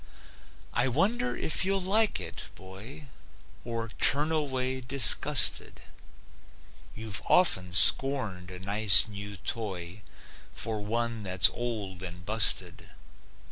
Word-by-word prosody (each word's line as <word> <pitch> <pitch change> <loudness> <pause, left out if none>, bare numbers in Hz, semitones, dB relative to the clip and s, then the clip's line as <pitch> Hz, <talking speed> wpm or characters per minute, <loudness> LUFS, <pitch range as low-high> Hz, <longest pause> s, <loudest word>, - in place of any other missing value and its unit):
I 120 +2 -1
wonder 215 - -3
if 160 - -4
you'll 195 +1 -3
like 205 +4 -1
it, - - -10
boy, 100 +10 -13 0.6
Or 115 -1 -8
turn 150 +3 -1
away 130 -4 -4
disgusted 125 -2 +3 1.2
(You've 110 -2 -6
often 90 - 0
scorned 100 -2 +4
a 90 - -12
nice, 100 -2 +6
new 100 -1 -10
toy 95 -3 -8 0.5
For 110 -1 -6
one 115 +1 -5
that's 95 -2 -1
old 105 -6 -8
and 90 -1 -12
busted.) 110 +1 -1
115 Hz, 105 wpm, -25 LUFS, 95-135 Hz, 1.2 s, nice